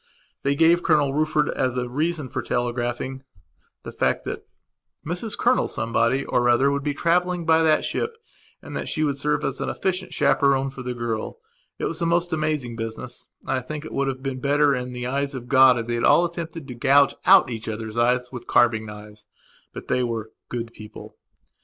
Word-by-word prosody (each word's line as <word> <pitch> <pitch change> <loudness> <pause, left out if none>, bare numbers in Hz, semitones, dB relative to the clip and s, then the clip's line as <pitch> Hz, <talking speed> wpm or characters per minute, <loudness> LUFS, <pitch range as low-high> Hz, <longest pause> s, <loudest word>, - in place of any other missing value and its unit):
They 140 +1 +1
gave 165 +3 +4
Colonel 150 -5 +2
Rufford, 155 0 +1
as 130 -1 -1
a 125 0 -1
reason 155 +3 -2
for 130 - -4
telegraphing, 120 +2 -2 0.6
the - - -7
fact - - 0
that - - -6 0.6
Mrs 180 +7 -3
Colonel 250 +1 +2
Somebody 115 +4 0
or 120 0 +1
other 130 +4 +4
would 140 0 -1
be 145 0 -2
travelling 175 +1 +1
by 160 0 +4
that 155 -1 +3
ship 460 0 -2 0.5
and - - -8
that - - -3
she 155 - -1
would 140 -2 0
serve 150 +1 0
as 135 0 -2
an - - -2
efficient 185 0 -2
chaperon 135 -1 +2
for 135 - -9
the 125 -1 -4
girl. 115 - -3 0.4
It - - -3
was - - -3
a 170 - +1
most 175 0 +1
amazing 150 -6 -1
business, 115 +2 -6 0.2
and - - -5
I 135 - +1
think 150 +4 -6
that 155 - -7
it - - -11
would 140 0 0
have 130 -1 -4
been 135 -2 -3
better 145 +1 +3
in 125 -1 -3
the 125 0 -5
eyes 140 +2 -2
of 120 -2 -7
God 130 -1 +6
if 115 - -3
they 120 - -3
had 120 - -1
all 175 - +5
attempted 165 -3 -6
to 125 - -6
gouge 135 +4 +4
out - - +7
each 110 -1 -5
other's 110 0 -5
eyes 125 +1 +1
with 125 -2 -8
carving 110 -2 +3
knives. 105 0 -11 0.4
But - - -9
they 125 - +1
were 115 -2 -3 0.2
"good 115 -1 -5
people". 105 0 -11
135 Hz, 205 wpm, -23 LUFS, 120-155 Hz, 0.6 s, out